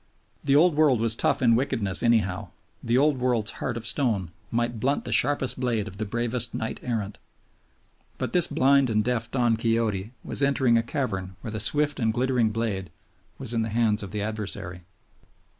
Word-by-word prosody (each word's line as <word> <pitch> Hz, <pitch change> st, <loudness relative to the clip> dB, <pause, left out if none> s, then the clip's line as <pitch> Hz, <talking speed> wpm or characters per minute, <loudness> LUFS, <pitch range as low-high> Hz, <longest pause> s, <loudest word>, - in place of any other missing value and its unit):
The 140 Hz, -1 st, +2 dB
Old 165 Hz, +2 st, +5 dB
World 145 Hz, -6 st, +4 dB
was 115 Hz, 0 st, +4 dB
tough 115 Hz, -, 0 dB
in 115 Hz, -2 st, +5 dB
wickedness 115 Hz, -7 st, 0 dB
anyhow; 110 Hz, -6 st, +1 dB, 0.3 s
the 115 Hz, +2 st, +1 dB
Old 145 Hz, -1 st, +3 dB
World's 120 Hz, -3 st, 0 dB
heart 120 Hz, -2 st, -2 dB
of 115 Hz, -, -6 dB
stone 105 Hz, -, 0 dB, 0.2 s
might 120 Hz, 0 st, -1 dB
blunt 135 Hz, +6 st, 0 dB
the -, -, -5 dB
sharpest 130 Hz, -2 st, +1 dB
blade 115 Hz, -5 st, -1 dB
of 95 Hz, -, -9 dB
the 110 Hz, -, -3 dB
bravest 120 Hz, +2 st, -1 dB
knight 110 Hz, -, -4 dB
errant. 110 Hz, -5 st, -3 dB, 1.0 s
But -, -, -4 dB
this 175 Hz, -1 st, +5 dB
blind 140 Hz, 0 st, +3 dB
and 110 Hz, -1 st, +1 dB
deaf 120 Hz, -1 st, -1 dB
Don 120 Hz, -3 st, +1 dB
Quixote 115 Hz, -3 st, 0 dB
was -, -, -4 dB
entering 135 Hz, -3 st, +3 dB
a 115 Hz, -, +4 dB
cavern 100 Hz, -7 st, -3 dB
where 115 Hz, -, -6 dB
the 110 Hz, -, -4 dB
swift 145 Hz, +6 st, +1 dB
and 110 Hz, -2 st, +2 dB
glittering 125 Hz, -1 st, +1 dB
blade 105 Hz, -4 st, -3 dB, 0.5 s
was 120 Hz, -, -2 dB
in 115 Hz, -, +1 dB
the 110 Hz, -, -2 dB
hands 110 Hz, -1 st, +2 dB
of 100 Hz, -, -6 dB
the 105 Hz, 0 st, -3 dB
adversary. 100 Hz, -4 st, -5 dB
115 Hz, 185 wpm, -26 LUFS, 110-130 Hz, 1.0 s, Old